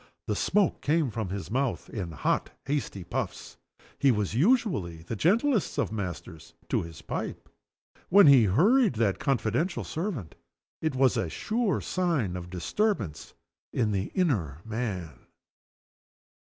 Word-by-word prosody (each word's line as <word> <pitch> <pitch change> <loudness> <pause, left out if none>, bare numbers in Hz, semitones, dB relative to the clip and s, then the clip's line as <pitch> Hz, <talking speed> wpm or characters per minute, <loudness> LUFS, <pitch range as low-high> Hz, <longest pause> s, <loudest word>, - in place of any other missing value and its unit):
The - - -1
smoke 205 -4 +1
came 150 -3 +1
from 110 -4 -3
his 100 +2 -5
mouth 130 +1 -1
in 95 -7 -5
hot 70 - 0 0.2
and 140 - -1
hasty 100 -10 -3
puffs. 85 - -5 0.4
He 140 - +4
was 105 -5 +1
usually 135 - +1
the 90 - -4
gentlest 220 - +2
of - - 0
masters 90 -6 -6
to - - +1
his 80 -1 -9
pipe. - - -5 0.6
When 200 +1 +8
he 135 -5 +8
hurried 195 - +4
that 105 -3 +1
confidential 135 - 0
servant, 160 - -4 0.5
it 155 -4 -1
was 130 -1 +3
a 85 - -1
sure 220 - -1
sign 160 - 0
of 90 -1 -6
disturbance 100 - -2 0.4
in 110 -4 +1
the 95 -1 0
inner 95 - 0
man. 95 - -4
120 Hz, 140 wpm, -28 LUFS, -, 0.6 s, When